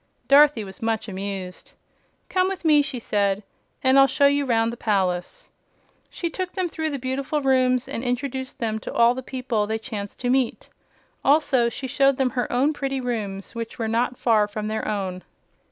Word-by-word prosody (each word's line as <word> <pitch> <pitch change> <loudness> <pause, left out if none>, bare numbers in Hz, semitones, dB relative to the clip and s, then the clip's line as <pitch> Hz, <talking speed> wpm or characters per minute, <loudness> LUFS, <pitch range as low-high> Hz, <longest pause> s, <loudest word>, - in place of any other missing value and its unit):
Dorothy 280 -4 +6
was 190 -1 -11
much 225 -1 -1
amused. 195 -2 -6 0.5
"Come 370 0 +1
with 380 -3 -5
me," 300 -2 +6
she 280 -2 -4
said, 200 -3 0 0.4
"and 260 +1 +5
I'll 275 - +7
show 280 - +2
you 285 0 +3
'round 230 -1 +2
the - - -5
palace." 200 - -1 0.6
She 345 - -4
took 365 +2 -4
them 370 -2 -1
through 315 -1 -3
the 285 - -3
beautiful 270 +3 -2
rooms 255 -2 +2
and 230 - -4
introduced 260 +1 -3
them 220 -2 -2
to - - -7
all 235 +1 +4
the 260 - -5
people 250 -5 -2
they 220 +1 -1
chanced 215 -3 -7
to 245 0 +1
meet. 260 -2 0 0.5
Also 275 -4 +3
she 265 - -7
showed 275 0 +2
them 260 -2 +1
her 245 0 -2
own 270 +5 +2
pretty 275 -2 -2
rooms, 210 -6 -4
which 230 -1 -6
were 225 - -2
not 240 +2 0
far 215 -3 +3
from 210 +1 -4
their 220 0 -3
own. 190 -3 -3
245 Hz, 185 wpm, -24 LUFS, 220-275 Hz, 0.6 s, I'll